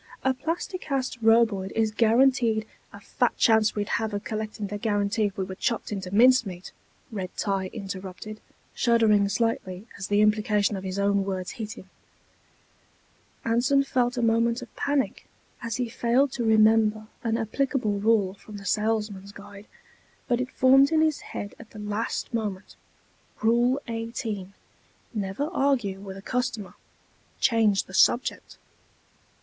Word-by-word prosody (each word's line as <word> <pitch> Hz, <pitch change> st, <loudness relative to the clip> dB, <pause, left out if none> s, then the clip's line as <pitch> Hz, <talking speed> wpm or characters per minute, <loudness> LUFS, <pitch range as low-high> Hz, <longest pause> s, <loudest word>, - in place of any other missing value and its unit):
A 265 Hz, -, +3 dB
Plasti 335 Hz, +7 st, -3 dB
Cast 260 Hz, -4 st, -3 dB
Roboid 225 Hz, -4 st, +3 dB
is 220 Hz, -1 st, +1 dB
guaranteed...." 230 Hz, 0 st, +3 dB, 0.3 s
"A -, -, -11 dB
fat -, -, -1 dB
chance 220 Hz, -2 st, +4 dB
we'd 205 Hz, +2 st, -1 dB
have 220 Hz, -2 st, -2 dB
of 205 Hz, -, -4 dB
collecting 215 Hz, -1 st, -4 dB
the 205 Hz, +1 st, -5 dB
guarantee 205 Hz, 0 st, 0 dB
if 200 Hz, -, -3 dB
we 190 Hz, -, -1 dB
were 190 Hz, 0 st, -6 dB
chopped 230 Hz, +4 st, -2 dB
into 190 Hz, -3 st, -4 dB
mincemeat," 210 Hz, -4 st, +3 dB, 0.4 s
Red 190 Hz, -4 st, -4 dB
tie 195 Hz, -2 st, -1 dB
interrupted, 195 Hz, 0 st, -7 dB, 0.3 s
shuddering 220 Hz, -4 st, +3 dB
slightly 200 Hz, -3 st, -2 dB
as 190 Hz, -, -4 dB
the 205 Hz, 0 st, +3 dB
implication 210 Hz, -1 st, +2 dB
of 190 Hz, -, -6 dB
his 190 Hz, 0 st, -4 dB
own 200 Hz, 0 st, +2 dB
words 190 Hz, -1 st, -3 dB
hit 220 Hz, -1 st, -6 dB
him. 190 Hz, -, -13 dB, 1.6 s
Anson 250 Hz, +5 st, +3 dB
felt 250 Hz, -2 st, 0 dB
a 240 Hz, -, 0 dB
moment 230 Hz, +2 st, +2 dB
of 245 Hz, -, -14 dB
panic 280 Hz, -2 st, -1 dB, 0.3 s
as 230 Hz, -2 st, -3 dB
he 245 Hz, -1 st, -1 dB
failed 245 Hz, +4 st, +1 dB
to 245 Hz, -, -3 dB
remember 220 Hz, -1 st, +4 dB, 0.2 s
an 230 Hz, -1 st, 0 dB
applicable 225 Hz, -2 st, -1 dB
rule 205 Hz, -3 st, +2 dB
from 205 Hz, +1 st, -11 dB
the 200 Hz, -, -11 dB
Salesman's 210 Hz, -1 st, -1 dB
Guide, 205 Hz, 0 st, -12 dB, 0.6 s
but 245 Hz, -1 st, +1 dB
it 255 Hz, -, -3 dB
formed 270 Hz, +3 st, +5 dB
in 315 Hz, -1 st, +3 dB
his 315 Hz, -2 st, +1 dB
mind 205 Hz, -, -5 dB
at 225 Hz, -, -12 dB
the -, -, -13 dB
last 210 Hz, +4 st, -3 dB
moment: 205 Hz, -4 st, -4 dB, 0.6 s
_Rule 240 Hz, +3 st, +3 dB
18: 225 Hz, -4 st, -5 dB, 0.6 s
Never 200 Hz, +3 st, -2 dB
argue 255 Hz, -, 0 dB
with 195 Hz, -1 st, -8 dB
a 195 Hz, -, -11 dB
customer 245 Hz, -6 st, -2 dB, 0.7 s
change 220 Hz, -5 st, +3 dB
the 190 Hz, -, -15 dB
subject. 240 Hz, +5 st, +2 dB
220 Hz, 150 wpm, -26 LUFS, 200-240 Hz, 1.6 s, formed